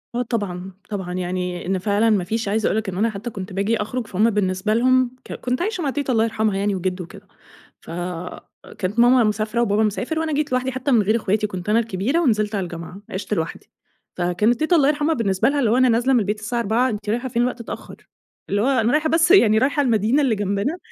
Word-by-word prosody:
آه، 245 - +1
طبعًا، 195 -6 -3 0.2
طبعًا، 190 -4 -4
يعني 180 0 -3
إن 190 +1 0
فعلًا 210 +3 +2
ما 200 -4 +2
فيش 220 +4 -2
عايزه 215 +2 +1
أقول 215 - 0
لك 220 -3 -2
إن 180 - -5
أنا 225 +3 +2
حتى 215 +3 -6
كنت 195 -3 -7
باجي 205 +4 0
أخرج 230 +2 -3
فهم 210 +4 +2
بالنسبة 200 0 0
لهم 255 +1 +2
ك - - -8
كنت 250 +3 -3
عايشه 375 -2 -2
مع 280 - 0
تيته 280 -1 -2
الله 225 -2 +3
يرحمها 220 -3 0
يعني 200 0 0
وجدو 185 0 -3
وكده، 165 - -14 0.5
فكانت 180 +4 -6
ماما 245 +1 +6
مسافره 215 +2 0
وبابا 215 -1 +2
مسافر 245 +9 -1
وأنا 320 -2 -1
جيّت 295 -1 -1
لوحدي 255 +1 0
حتى 260 +2 -2
من 230 - +5
غير 210 +2 +1
أخواتي 210 -1 0
كنت 185 0 -6
أنا 225 - +4
الكبيرة 230 - -1
ونزلت 215 -8 +1
على 195 - -1
الجامعة، 170 +2 -8
عِشت 195 +2 -4
لوحدي 160 -4 -4 0.5
فكانت 180 +7 +1
تيته 315 +3 +2
الله 280 -4 +4
يرحمها 300 +2 +1
بالنسبة 200 -3 +1
لها 290 - 0
اللي 235 -6 +2
هو 245 - +3
أنا 255 -1 +4
نازله 240 +4 +2
من 245 - +5
البيت 210 +1 -2
الساعة 235 +2 -3
16:00 235 +4 +1
أنتِ 210 -1 -5
رايحه 245 +4 -1
فين 235 0 0
الوقت 245 -1 -1
اتأخر؟ - - -9 0.4
اللي 205 +1 +1
هو 245 - +1
أنا 245 -4 +2
رايحه 310 +1 +2
بس 330 +2 +3
يعني 225 - +6
رايحه 285 +6 +2
المدينة 235 +1 +2
اللي 255 -6 +2
جنبنا. 205 - -1
220 Hz, 225 wpm, -21 LUFS, 195-255 Hz, 0.5 s, ماما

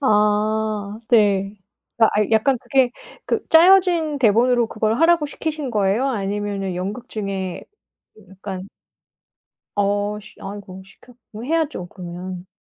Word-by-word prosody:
아 210 -2 +1
네. 205 -3 +3 0.4
아 225 - +6 0.2
약간 240 +4 +3
그게 260 -2 +2 0.3
그 - - -1
짜여진 340 -3 +5
대본으로 235 +1 +3
그걸 220 +2 -1
하라고 330 -2 +4
시키신 300 -2 -4
거예요? 210 +6 +1
아니면은 200 -3 -2
연극 205 +7 -5
중에 195 -4 -4 0.5
그 215 - -19
약간 190 0 -7 1.1
어씨 205 +1 -1
아이고 195 -1 -8
시켰 215 +6 -19 0.2
뭐 220 +2 -8
해야죠 310 - -1
그러면. 180 0 -8
210 Hz, 245 characters per minute, -21 LUFS, 195-255 Hz, 1.1 s, 아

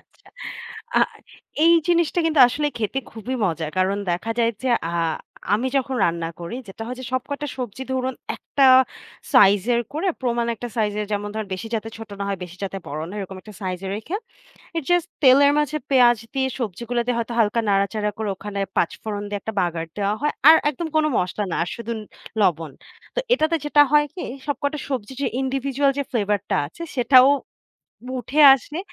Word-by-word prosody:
আচ্ছা। - - -32 0.7
আ - - +7 0.7
এই 335 - +7 0.2
জিনিসটা 340 0 +2
কিন্তু 310 -3 +3
আসলে 295 +4 -1
খেতে 225 +4 -1
খুবই 230 +4 -5
মজা। 165 -4 -1
কারণ 195 +2 +1
দেখা 180 +6 -2
যায় 230 0 +3
যে, 260 - 0 0.2
আ - - -3 0.6
আমি 240 +5 0
যখন 265 0 0
রান্না 170 -1 -1
করি 170 +8 -5
যেটা 210 +3 -8
হয় 250 +1 -5
যে 255 - -7
সবকটা 285 +3 -2
সবজি 250 0 -5
ধরুন 260 0 -1 0.2
একটা 275 - 0 0.7
সাইজের 205 +4 +5
করে, 330 +6 -1
প্রমাণ 235 -2 0
একটা 240 +2 -6
সাইজের। 210 -1 0
যেমন 205 0 -2
ধরেন 215 -2 -4
বেশি 185 - -6
যাতে 225 0 -2
ছোট 225 - -9
না 200 - -2
হয়, 195 -1 -2
বেশি 180 0 -12
যাতে 195 0 -4
বড় 150 +2 -5
না 185 - -9
হয় 210 - -4
এরকম 190 0 -8
একটা 215 -2 -12
সাইজ 185 -1 -3
এ - - -3
রেখে 220 - -6 0.6
it's 315 - -3
just 350 0 +3 0.2
তেলের 280 +2 +7
মাঝে 300 +1 0
পেঁয়াজ 245 -3 +5 0.2
দিয়ে 265 -1 +1
সবজিগুলো 235 +2 -3
দিয়ে 245 -1 0
হয়তো 235 +1 -3
হালকা 225 +1 +3
নাড়াচাড়া 205 +2 +1
করে 220 -2 -2
ওখানে 200 +1 -6 0.2
পাঁচফোড়ন 205 +4 -1
দিয়ে 205 - -3
একটা 220 - -5
বাগার 170 -2 -1
দেওয়া 200 0 +1
হয়। 295 - +1 0.2
আর 320 - +10
একদম 320 +3 -4
কোন 310 - +4
মসলা 185 +3 -1
না। - - -1
আর 175 - -5
শুধু 235 0 -6
ন - - -5 0.4
লবণ। 165 -6 +1 0.4
তো - - +1
এটাতে 330 -8 +2
যেটা 295 0 +5
হয় 295 0 +5
কি 370 - -7 0.3
সব 290 - 0
কটা 285 +2 0
সবজি 255 -4 -3
যে - - +1 0.2
individual 270 +1 0
যে 280 - 0
ফ্লেভার 210 -3 +1
টা 195 - +2
আছে 235 - -14 0.2
সেটাও 255 +1 +7 0.8
বু 255 - -5
উঠে 280 +6 0
আসলে, 295 +4 -6
235 Hz, 195 wpm, -22 LUFS, 200-270 Hz, 0.8 s, আর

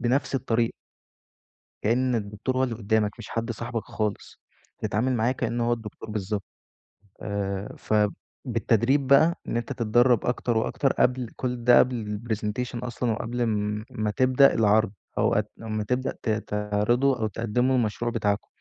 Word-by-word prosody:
بنفس 130 +3 0
الطريقة. 115 -2 +1 1.1
كأن 125 +3 +2
الدكتور 105 +4 -2
هو 130 - +3
اللي 120 -3 -3
قدّامك، 110 -1 +1
مش 115 - -9
حد 115 0 -3
صاحبك 115 0 -4
خالص، 105 -2 -4 0.4
تتعامل 125 +5 0
معاه 120 +3 +2
كأنّه 120 -2 -1
هو - - +2
الدكتور 110 -1 -6
بالضبط، 105 -1 -3 0.8
آآ، 100 -1 -3 0.7
فبالتدريب 120 +3 +2
بقى 160 +6 +5
إن 115 - -1
أنت 120 - -3
تتدرّب 120 +1 +3
أكتر 120 -1 0
وأكتر 135 +4 +1
قبل 125 -2 +1
كل 125 -2 -3
ده 120 0 +7
قبل 110 -5 0
الpresentation 115 +3 -2
أصلًا 120 -1 -2
وقبل 120 +2 -3
ام 105 -1 -1
امّا 110 -1 -1
تبدأ 130 +3 +5
العرض 110 -1 +3 0.3
أو - - +2 0.2
ما 110 -1 -3
تبدأ 125 +4 -1
ت - - -1
تعرضوا 105 +5 +1
أو 110 - +1
تقدموا 115 +4 0
المشروع 115 -1 0
بتاعكم، 105 -3 -1
115 Hz, 145 wpm, -26 LUFS, 105-125 Hz, 1.1 s, ده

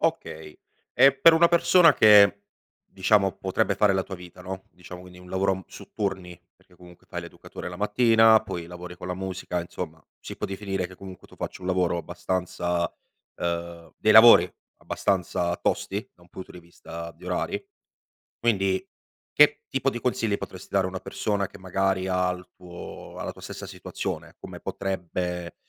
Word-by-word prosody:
Okay. 80 -1 -3 0.4
E 135 0 +7
per 165 +4 +7
una 170 +1 +5
persona 170 -2 +5
che 100 -2 +7 0.5
diciamo 95 0 +3
potrebbe 95 +1 0
fare 100 0 +3
la 95 - +1
tua 95 - -8
vita, 90 0 -13
no, 95 0 -7
diciamo 90 0 -11
quindi 90 0 -14
un 90 0 -14
lavoro 95 0 0
su - - -13
turni, 95 -4 -4 0.2
perché 90 - -26
comunque 90 0 -17
fai - - -5
l'educatore - - -9
la 90 - -8
mattina, 110 +2 +5
poi 85 -5 -6
lavori 90 +1 -9
con 90 - -9
la 90 - -3
musica, 95 -1 -4
insomma 80 -2 -7 0.2
si - - -8
può - - -3
definire 95 -2 -3
che 95 - -14
comunque 95 -2 -11
tu - - -18
faccio - - -6
un 90 - -4
lavoro 90 -2 +1
abbastanza, 90 0 -2 0.4
ehm, 85 -1 -4
dei 110 - +3
lavori 110 -6 +8 0.3
abbastanza 90 -2 -1
tosti, - - -2
da - - -28
un 90 - -20
punto 95 +1 -10
di 90 - -11
vista 85 -1 -9
di 80 - -17
orari. - - -2 0.7
Quindi, 95 -5 +1 0.5
che 150 0 +5
tipo 135 0 -1
di 120 -3 -2
consigli 115 -4 0
potresti - - -9
dare 95 -1 +2
a - - -3
una 95 0 -5
persona 100 -2 -2
che 100 - -14
magari 95 0 -1
ha 90 -1 +1
il 90 0 -9
tuo 90 -1 -10
ha - - -4
la - - -4
tua - - -16
stessa - - -8
situazione? - - -6
Come - - -9
potrebbe, 90 -2 -4
95 Hz, 175 wpm, -25 LUFS, 90-100 Hz, 0.7 s, lavori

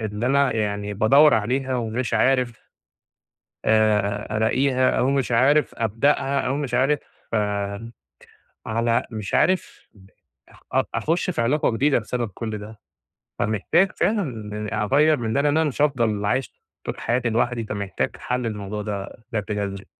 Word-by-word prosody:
اللي 110 +1 -3
أنا 140 -1 +2
يعني 105 -1 -2
بادوّر 135 +7 +6
عليها 130 +4 0
ومش 120 +1 -2
عارف 125 -3 +1 0.9
آآ 105 -1 +2
ألاقيها، 130 +3 +2
أو 130 - +1
مش 135 -3 0
عارف 135 +4 +3
أبدأها، 135 +5 +1
أو 130 +2 -1
مش 140 -4 -3
عارف 135 +4 +2 1.7
على 115 +2 +1
مش 110 -3 -6
عارف 185 +2 0 0.8
أ - - +3
أخش 165 +3 0
في 165 - -1
علاقة 130 +5 +2
جديدة، 135 +4 +2
بسبب 120 +1 -3
كل 110 -2 -4
ده. 105 +1 -10 0.6
فمحتاج 140 - +2
فعلًا 110 - -2 0.2
أغيَّر 150 +6 +4
من 110 -2 -2
ده، 140 - +2
لأن 145 +1 +2
أنا 160 -1 +2
مش 145 - -4
هافضل 115 -8 +1
عايش 130 +6 -1 0.3
طول - - -4
حياتي 120 0 0
لوحدي، 120 +1 0
فمحتاج 100 -3 -3
حل 125 0 -2
للموضوع 105 -2 -4
ده 105 +1 -6
بشكل 105 -1 -2
جذري. 100 -1 -4
115 Hz, 140 wpm, -23 LUFS, 105-135 Hz, 1.7 s, بادوّر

